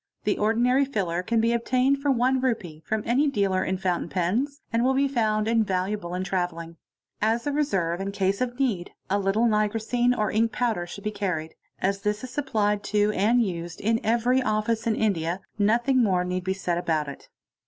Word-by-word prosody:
The 205 - 0
ordinary 240 +5 +3
filler 190 -10 -1
can 230 +5 0
be 230 +1 +2
obtained 255 +3 +2
for 285 +1 -1
Re. 265 - +3 0.4
1 160 -7 -11
from 220 -1 -2
any 260 +6 +2
dealer 195 -7 +1
it 190 0 -2
fountain 180 -3 -1
pens, 230 - -1
and 230 +1 +2
will 265 +1 +2
be 275 +1 +3
found 215 -5 0
invaluable 195 -4 0
in 185 - -2
travelling. 175 -3 -3 0.4
As 225 +2 +1
a 290 - 0
reserve 195 - 0
in 195 0 -3
case 195 +1 0
of 245 0 -2
need, 210 -10 -1 0.2
a 200 - +2
little 200 +4 +1
nigrosine 225 +3 +1
or 215 - 0
ink 225 +1 +2
powder 220 -10 -1
should 200 +3 -9
be 210 - -1
carried. 180 -6 -3 0.3
this 195 +1 0 0.2
is 255 - -6
supplied 215 -7 0
to 210 0 +2
and 225 +5 +3
used 170 -2 -5
in 225 +2 0
every 240 +3 +2
office 220 0 0
in 220 - +2
India, 180 -5 0 0.2
nothing 240 +5 +3
more 185 -5 +2
need 180 0 -3
b 190 - +1
said 180 -3 -2
about 155 -4 0
it. 140 - -10
210 Hz, 190 wpm, -25 LUFS, 185-235 Hz, 0.4 s, ordinary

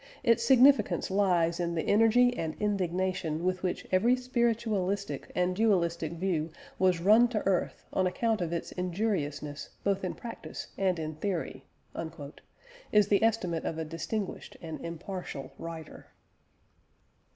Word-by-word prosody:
Its 230 -2 +4
significance 265 -2 +5
lies 175 -4 +2
in 170 -1 -1
the 160 - 0
energy 230 +4 +5
and 160 -5 -3
indignation 185 -4 -1
with 185 0 0
which 185 -2 -2
every 225 +7 +4
spiritualistic 220 - -1
and 180 0 +1
dualistic 170 -6 +1
view 170 -2 -1 0.3
was 185 -2 +3
run 215 +7 +6
to 225 -3 -3
earth 190 -2 0
on 185 -1 +2
account 220 +3 0
of 170 -2 -2
its 170 - -3
injuriousness 165 -6 -2
both 195 -1 0
in 185 - -2
practice 235 -2 -8
and 190 -2 +1
in 155 -1 -4
theory," 160 -5 -3 1.3
is 210 -1 +4
the 200 - +4
estimate 200 -7 +1
of 160 - -3
a 160 - -3
distinguished 170 +6 -4
and 160 -2 -7
impartial 170 -3 -6
writer. 165 -2 -8
185 Hz, 135 wpm, -30 LUFS, 165-215 Hz, 1.3 s, run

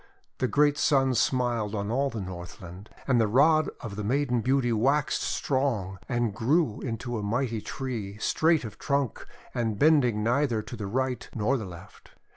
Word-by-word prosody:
The 130 - +1
great 145 +2 +3
Sun 135 -3 +3
smiled 120 -4 0
on 100 +1 -2
all 135 +3 +1
the 115 -5 -5
Northland. 90 +1 -9 0.2
And 125 -4 +4
the 110 - +3
rod 155 +7 +4
of 105 -4 -6
the 105 - -3
Maiden 125 +1 +1
Beauty 130 -1 +1
waxed 135 +7 +1
strong 115 -9 -1
and 120 -4 0
grew 130 - +1
into 120 -1 -3
a - - -4
mighty 115 +2 -1
tree, 110 -7 -5
straight 160 +5 +2
of 110 -1 -9
trunk, 140 -5 -1 0.3
and 115 -4 -1
bending 125 -8 +4
neither 120 -2 +1
to 120 - -8
the 105 -3 -5
right 130 +4 -2
nor 115 +4 +1
the 115 -6 -3
left. 85 -2 -13
120 Hz, 170 wpm, -27 LUFS, 105-135 Hz, 0.3 s, And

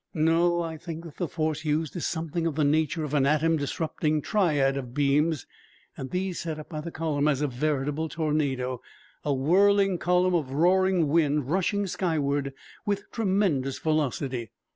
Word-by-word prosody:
No, 170 +2 +3
I 160 -1 -5
think 165 0 -7
that 165 -4 -11
the 175 - -1
force 155 -1 -2
used 155 0 -1
is 175 - -2
something 165 0 -2
of 160 - -2
the 155 - +1
nature 155 +2 +1
of 150 -1 -4
an 140 -2 +3
atom 155 +2 +3
disrupting 155 +1 -1
triad 150 -10 +2
of 125 -2 -6
beams 145 +1 +2 0.5
and 130 - -6
that - - -22
these 185 -1 -2
set 160 -2 -4
up 155 - -9
the 170 - -5
column 155 -3 -1
as 145 -1 +1
a - - +2
veritable 145 +3 -1
tornado, 140 -5 -1 0.4
a 145 - 0
whirling 190 +7 +3
column 180 +1 +2
of 145 -6 -1
roaring 180 +2 +3
wind 150 -2 +1
rushing 195 +3 +1
skyward 145 -7 -1 0.3
with 200 -2 -3
tremendous 190 - 0
velocity. 135 -6 -1
155 Hz, 165 wpm, -27 LUFS, 145-170 Hz, 0.5 s, No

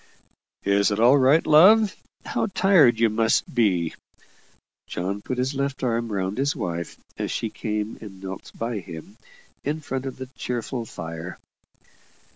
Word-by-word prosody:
"Is 100 +1 +3
all 115 +6 +5
right, 135 +5 +4
love? 200 +7 +6 0.3
How - - -1
tired 180 - +4
you 115 - +5
must 110 +1 +1
be!" 95 -9 +2 0.9
John 95 +3 -3
put 130 +4 -4
his 130 +3 0
left 140 0 -2
arm 115 -2 0
round 95 +3 -2
his 140 +1 +1
wife 85 -1 -4 0.2
as - - -2
she - - -2
came 105 0 -3
and 100 -4 -10
knelt 95 0 -8
by 115 -1 -2
him, 90 +3 -10 0.5
in 150 +3 -2
front 135 -3 -4
of 130 - -6
the 130 - -6
cheerful 120 0 -3
fire. 80 -2 -7
115 Hz, 145 wpm, -24 LUFS, 100-135 Hz, 0.9 s, love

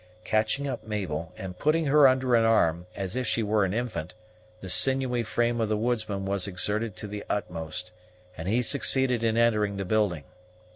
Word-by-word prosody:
Catching 110 +6 0
up 130 -3 -4
Mabel, 90 -7 -4
and 90 -1 -7
putting 155 +2 +2
her 145 0 +6
under 130 -1 +2
an 115 -1 +5
arm, 90 -6 +2
as 95 +2 -4
if 130 -1 -2
she 115 - +1
were 105 0 +2
an 95 - -2
infant, 110 -7 -4 0.4
the 95 - -9
sinewy 130 +4 +2
frame 120 +1 0
of 110 - 0
the 110 - +1
woodsman 110 -4 -2
was 100 0 0
exerted 105 +3 -2
to 105 - -7
the 105 0 -6
utmost, 90 -2 -4 0.4
and 80 0 -7
he 115 +5 +1
succeeded 130 -2 +3
in 115 0 +1
entering 105 -4 +2
the 95 - -3
building. 100 -6 0
110 Hz, 185 wpm, -27 LUFS, 95-120 Hz, 0.4 s, her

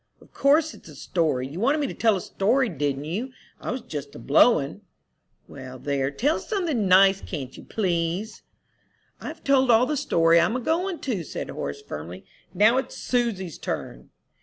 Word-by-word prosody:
"Of - - -21
course 300 +3 +3
it's - - -15
a 150 - -12
story. 150 -5 -1
You 150 +6 -7
wanted 275 +8 +2
me 295 - 0
to - - -4
tell 225 -3 +2
a - - -5
story, 240 +6 +1
didn't 145 -3 -2
you? 220 +12 -4 0.3
I - - -6
was 255 +2 -3
just 145 -7 -7
a - - -7
blowin'." 145 - +3 0.7
"Well, 130 0 -9
there, 135 0 -1
tell 270 - 0
something 330 - -1
nice, 195 +1 +6
can't 135 -7 -6
you, - - -11
please?" 180 +1 -2 0.8
"I've - - -8
told 265 -2 +3
all 235 +1 +6
the 300 - -1
story 170 - +3
I'm 175 +8 +2
a - - 0
goin' 340 +5 -1
to," 230 -9 -2
said - - -6
Horace, 70 0 -5
firmly. 85 +5 -8 0.3
"Now 220 +5 +4
it's 265 - -3
Susy's 220 - -2
turn." 60 - -5
195 Hz, 180 wpm, -25 LUFS, -, 0.8 s, nice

